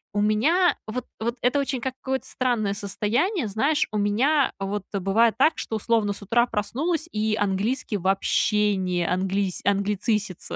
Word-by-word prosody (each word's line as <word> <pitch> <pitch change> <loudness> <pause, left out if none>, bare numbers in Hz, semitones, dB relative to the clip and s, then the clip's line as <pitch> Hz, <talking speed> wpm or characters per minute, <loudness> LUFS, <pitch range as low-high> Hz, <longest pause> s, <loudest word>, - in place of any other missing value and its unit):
у 205 - +2
меня 295 - +3
вот 235 +3 -5
вот 235 +2 -2
это 250 +3 +2
очень 270 -2 -2
какое-то 260 +1 -3
странное 230 -6 0
состояние. 225 - -1
Знаешь, 275 +9 +1
у 215 - -2
меня 255 +9 +2
вот 195 0 -3
бывает 200 +4 +2
так, 310 +4 +5
что, 220 - -3
условно, 215 -1 +1
с 200 - -11
утра 235 +4 +2
проснулась, 300 - -2
и 215 0 0
английский 205 +3 -1
вообще 200 +2 +1
не 180 -2 -1
английс 190 +1 -1
англицисится. 200 0 -1
215 Hz, 150 wpm, -24 LUFS, 200-255 Hz, -, так